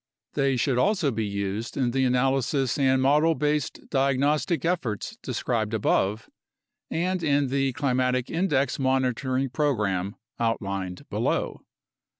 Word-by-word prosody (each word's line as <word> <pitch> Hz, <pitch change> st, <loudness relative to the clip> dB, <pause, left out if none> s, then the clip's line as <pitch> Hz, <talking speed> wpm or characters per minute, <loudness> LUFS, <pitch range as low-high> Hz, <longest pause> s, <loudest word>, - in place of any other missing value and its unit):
They 135 Hz, -2 st, +1 dB
should 125 Hz, 0 st, +1 dB
also 190 Hz, -4 st, +2 dB
be 110 Hz, -2 st, -2 dB
used 100 Hz, +2 st, -3 dB
in 125 Hz, -3 st, +1 dB
the 130 Hz, +1 st, +1 dB
analysis 130 Hz, +1 st, +1 dB
and 130 Hz, -1 st, +3 dB
model 150 Hz, +4 st, +4 dB
based 150 Hz, -1 st, -1 dB
diagnostic 140 Hz, +5 st, +1 dB
efforts 140 Hz, -, -2 dB
described 110 Hz, -3 st, -1 dB
above 105 Hz, 0 st, +1 dB, 0.6 s
and 180 Hz, +2 st, -1 dB
in 145 Hz, -3 st, +2 dB
the 135 Hz, 0 st, 0 dB
climatic 125 Hz, -1 st, 0 dB
index 150 Hz, -7 st, +1 dB
monitoring 130 Hz, 0 st, 0 dB
program 105 Hz, -, 0 dB, 0.2 s
out 115 Hz, -1 st, +1 dB
lined 95 Hz, -3 st, -5 dB
below. -, -, -1 dB
130 Hz, 125 wpm, -26 LUFS, 115-145 Hz, 0.6 s, model